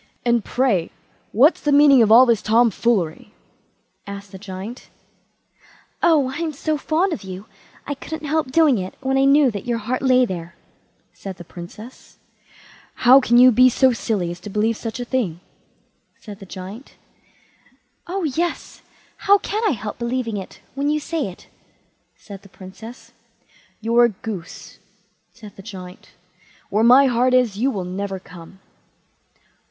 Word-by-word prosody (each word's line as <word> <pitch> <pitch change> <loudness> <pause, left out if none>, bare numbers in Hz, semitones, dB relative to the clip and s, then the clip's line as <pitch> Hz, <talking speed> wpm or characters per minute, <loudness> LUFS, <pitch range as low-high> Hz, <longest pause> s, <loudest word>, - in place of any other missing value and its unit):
"And, 235 -2 +2
pray, 230 -10 0 0.4
what's 275 - +4
the 295 - 0
meaning 285 -3 +6
of 220 -1 +3
all 245 +3 +8
this 235 -4 +2
tom 230 +2 +3
foolery?" 205 -2 -1 0.7
asked 200 -1 -9
the 190 - -10
Giant. 195 +5 -9 1.1
"Oh, 300 -6 +3
I'm 315 +1 -3
so 310 +2 -2
fond 325 +5 0
of 300 - -6
you, 190 +1 -8 0.4
I 285 - -3
couldn't 310 +2 -8
help 305 -3 -1
doing 295 -6 +4
it 185 0 -6
when 265 0 -1
I 270 0 +3
knew 280 -1 +4
that 205 +1 -7
your 240 -1 0
heart 240 +3 -3
lay 255 -1 +4
there", 175 -4 -7 0.6
said 190 -2 -9
the 175 - -10
Princess. 180 +8 -12 0.9
"How 255 +3 +9
can 240 -2 +2
you 255 +1 +8
be 255 +2 +5
so 260 +1 +3
silly 200 -7 -2
as 175 - -8
to 205 - -9
believe 215 +3 0
any - - -15
such - - -8
thing?" 235 -9 -2 0.8
said 205 -2 -11
the 195 - -12
Giant. 195 +8 -10 1.1
"Oh 375 +2 -3
yes; 330 +3 -3 0.4
how 405 +1 +4
can 420 +2 -4
I 395 - +2
help 215 -2 -7
believing 235 -2 -2
it, 190 - -9
when 280 +2 -1
you 305 0 +1
say 310 -2 -3
it", 185 - -12 0.7
said 200 -2 -12
the 200 - -17
Princess. 215 +7 -12 0.7
"You're 235 +2 +4
a - - +2
goose", 200 -4 -9 0.5
said 210 -3 -14
the - - -10
Giant; 185 -3 -11 0.6
"where 210 +3 +2
my 255 +4 +7
heart 255 0 +2
is, 240 -6 +2
you 260 +4 +2
will 195 -8 -4
never 195 +2 -4
come." 180 +1 -14
235 Hz, 160 wpm, -21 LUFS, 195-270 Hz, 1.1 s, How